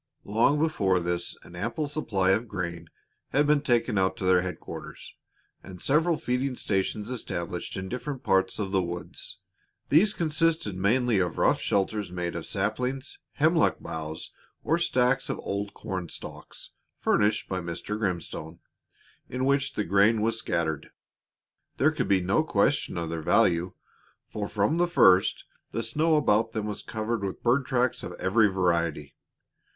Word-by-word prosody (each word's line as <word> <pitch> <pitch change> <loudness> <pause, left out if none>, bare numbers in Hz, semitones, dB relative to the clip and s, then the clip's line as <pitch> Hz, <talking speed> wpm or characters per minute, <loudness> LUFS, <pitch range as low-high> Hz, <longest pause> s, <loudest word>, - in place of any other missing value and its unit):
Long 115 +8 +3
before 105 - +2
this 85 0 -2
an 85 - -13
ample 150 - -2
supply 100 -11 0
of 110 +5 +1
grain 85 -4 -5 0.4
had 145 +2 +3
been 150 0 +3
taken 120 -6 +1
out 95 0 +1
to - - -6
their 90 -1 +5
headquarters 90 0 -7 0.5
and 90 -2 -11
several 160 - +2
feeding 125 0 -1
stations 105 +2 -1
established 90 -9 -4
in 95 0 -4
different 130 +6 -5
parts 95 0 +2
of 100 -3 -3
the 95 -1 +2
woods. 85 0 -6 0.5
These 195 +8 +4
consisted 160 - +1
mainly 110 +3 +2
of 90 -3 -1
rough - - +3
shelters 100 -1 0
made 90 -1 -3
of 85 - -5
saplings, 125 +7 -2
hemlock 160 +2 +3
boughs, 80 0 -6 0.3
or 165 +3 +1
stacks 125 -5 +1
of - - -2
old 100 0 -3
corn 90 -4 -5
stalks, - - -9 0.3
furnished 105 +1 +1
by 95 - -2
Mr. 85 +5 -4
Grimstone, 90 -5 -3 0.7
in 130 +1 -2
which 140 0 +1
the 105 - 0
grain 105 +4 +3
was 115 0 +1
scattered. 85 -8 -2 0.9
There - - +4
could - - -2
be 95 -1 +3
no 95 +3 +2
question - - +1
of 85 -1 -3
their 85 -1 -3
value, 85 +3 +2 0.5
for 105 -1 -4
from 105 +10 +1
the 175 0 +3
first 95 - +4 0.3
the 115 - -2
snow 155 +8 +2
about 115 -6 +2
them 110 -3 -2
was 105 -1 -4
covered 110 0 -3
with 95 -1 -4
bird 130 +3 +2
tracks 125 -2 +1
of - - -6
every 105 +4 +3
variety. 85 -6 0
105 Hz, 155 wpm, -27 LUFS, 90-130 Hz, 0.9 s, their